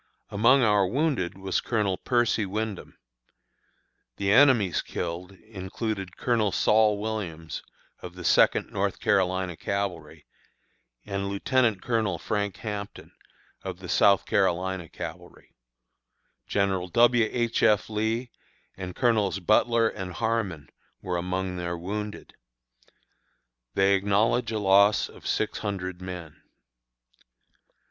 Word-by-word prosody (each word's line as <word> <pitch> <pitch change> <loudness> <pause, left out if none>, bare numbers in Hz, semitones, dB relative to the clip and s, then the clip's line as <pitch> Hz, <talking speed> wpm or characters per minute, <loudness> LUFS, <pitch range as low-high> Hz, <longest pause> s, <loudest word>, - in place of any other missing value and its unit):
Among 120 +6 +4
our 105 -3 +3
wounded 130 - -1
was 95 -1 -1
Colonel 105 -5 0
Percy 120 0 +1
Wyndham. 105 0 -5 1.2
The 100 0 0
enemy's 115 - +5
killed 90 +3 -5
included 95 -1 -6
Colonel 115 -5 +1
Saul 105 +1 +3
Williams, 100 -7 -5 0.4
of 90 -1 -9
the 90 - -9
Second - - +3
North - - -1
Carolina 95 -2 +1
Cavalry, 100 -2 -4 0.8
and 100 -1 -3
Lieutenant 110 +1 +1
Colonel 110 -7 0
Frank 100 +2 -2
Hampton, 105 -2 -6 0.5
of - - -6
the - - -10
South 100 -1 +4
Carolina 95 -4 0
Cavalry; - - -9 0.9
General 95 -2 0
W. 120 +3 +4
H. 120 -2 0
F. 105 -1 +3
Lee 110 +3 -2 0.4
and 90 -2 -7
Colonels 110 -6 +1
Butler 115 +4 +3
and 95 -4 -5
Harmon 105 - -2 0.3
were 90 -1 -2
among 90 +1 -3
their 85 0 -3
wounded. 105 +4 -6 1.4
They 95 0 +4
acknowledge 105 +4 +1
a 110 - -1
loss 100 +1 +4
of - - -12
six - - -1
hundred 95 -3 -4
men. 90 -4 -8
100 Hz, 110 wpm, -26 LUFS, 95-110 Hz, 1.4 s, enemy's